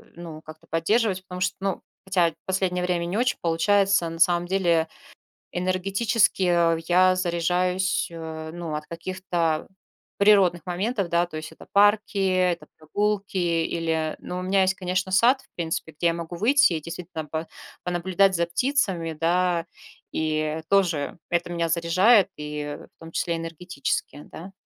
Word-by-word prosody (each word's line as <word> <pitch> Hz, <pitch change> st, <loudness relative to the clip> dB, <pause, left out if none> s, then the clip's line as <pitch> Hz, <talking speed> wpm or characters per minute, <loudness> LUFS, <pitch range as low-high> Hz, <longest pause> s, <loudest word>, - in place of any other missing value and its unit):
ну, 165 Hz, -2 st, -9 dB
как-то 155 Hz, 0 st, -13 dB
поддерживать. 190 Hz, +4 st, +1 dB
Потому 180 Hz, -1 st, -8 dB
что, 185 Hz, -1 st, 0 dB
ну, 195 Hz, -1 st, -2 dB, 0.2 s
хотя, 175 Hz, -4 st, +2 dB
последнее 185 Hz, -1 st, 0 dB
время 175 Hz, -1 st, 0 dB
не 185 Hz, +5 st, -2 dB
очень 245 Hz, 0 st, +1 dB
получается, 190 Hz, +2 st, +2 dB
на 165 Hz, 0 st, -8 dB
самом 175 Hz, 0 st, +3 dB
деле. 170 Hz, -4 st, +2 dB, 0.7 s
Энергетически, 195 Hz, +4 st, +1 dB
э, 170 Hz, -2 st, +3 dB
я 185 Hz, +1 st, +4 dB
заряжаюсь, 180 Hz, +1 st, 0 dB
э, 160 Hz, -1 st, -7 dB
ну, 170 Hz, -3 st, -5 dB
от 150 Hz, 0 st, -5 dB
каких-то 170 Hz, -2 st, -2 dB, 0.5 s
природных 195 Hz, -4 st, +5 dB
моментов, 195 Hz, +2 st, -1 dB
да. 170 Hz, +1 st, +2 dB
То 160 Hz, -, -9 dB
есть 155 Hz, 0 st, -6 dB
это -, -, -14 dB
парки, 205 Hz, +2 st, +3 dB
это 185 Hz, -2 st, +1 dB
прогулки 200 Hz, +5 st, -2 dB
или 165 Hz, -2 st, 0 dB
но 180 Hz, -, -6 dB
у -, -, -4 dB
меня 190 Hz, +1 st, +2 dB
есть, 190 Hz, +1 st, +2 dB
конечно, 185 Hz, 0 st, -2 dB
сад, 245 Hz, +7 st, +5 dB
в -, -, -26 dB
принципе, 160 Hz, -1 st, -3 dB
где 165 Hz, +3 st, -2 dB
я 165 Hz, -, +1 dB
могу 170 Hz, +1 st, -6 dB
выйти 265 Hz, +1 st, +4 dB
и, 155 Hz, -, -2 dB
действительно, 170 Hz, -1 st, -6 dB
по 160 Hz, +2 st, -4 dB, 0.4 s
понаблюдать 185 Hz, +2 st, +2 dB
за 170 Hz, 0 st, +1 dB
птицами, 180 Hz, -, 0 dB
да. 170 Hz, +1 st, +1 dB, 0.5 s
И 155 Hz, 0 st, -1 dB
тоже 175 Hz, -7 st, +1 dB
это 175 Hz, 0 st, 0 dB
меня 170 Hz, -1 st, -1 dB
заряжает, 185 Hz, +6 st, +4 dB
и, 150 Hz, -1 st, -5 dB, 0.2 s
в -, -, -70 dB
том 165 Hz, 0 st, -11 dB
числе, 170 Hz, -1 st, -1 dB
энергетически, 165 Hz, -3 st, -4 dB
да. 190 Hz, +4 st, -10 dB
175 Hz, 155 wpm, -25 LUFS, 165-190 Hz, 0.7 s, природных